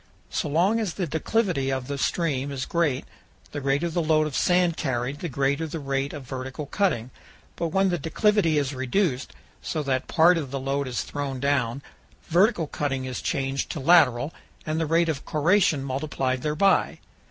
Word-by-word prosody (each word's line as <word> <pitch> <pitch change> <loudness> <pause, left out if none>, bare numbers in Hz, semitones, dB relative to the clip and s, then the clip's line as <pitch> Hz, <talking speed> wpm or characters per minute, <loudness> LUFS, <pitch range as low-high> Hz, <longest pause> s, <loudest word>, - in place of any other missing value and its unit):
So - - -1
long 185 +9 +2
as 205 -7 -2
the 185 - -1
declivity 165 -2 0
of 130 -1 -2
the 140 +1 -4
stream 140 -4 0
is 130 -1 -3
great, 150 -6 0 0.5
the 145 - -4
greater 140 +5 +1
the 170 +1 -1
load 155 -1 +3
of 150 -4 -4
sand 180 -2 +3
carried 130 +1 -2
the 175 - -4
greater 140 +4 0
the 160 +1 -5
rate 135 0 -2
of 145 -3 -7
vertical 130 +3 -6
cutting; 140 - 0 0.4
but 170 - -1
when 195 +4 +2
the 175 -2 -1
declivity 165 +1 +2
is 145 -1 0
reduced, 130 +2 -1 0.3
so 155 - -3
that 130 -2 -1
part 170 +1 +5
of 140 -4 -5
the 135 +1 -3
load 135 +1 -1
is 120 -4 -2
thrown 140 -2 -4
down, 135 -2 0 0.5
vertical 180 +1 +3
cutting 135 -3 -2
is 130 -1 -4
changed 135 -3 -2
to - - -5
lateral 145 -2 +4 0.3
and 155 +1 -1
the 160 - 0
rate 165 +2 +3
of 155 -5 -2
corrosion 160 -2 +2
multiplied 135 -1 -2
thereby. 155 +7 +2
145 Hz, 180 wpm, -25 LUFS, 135-170 Hz, 0.5 s, part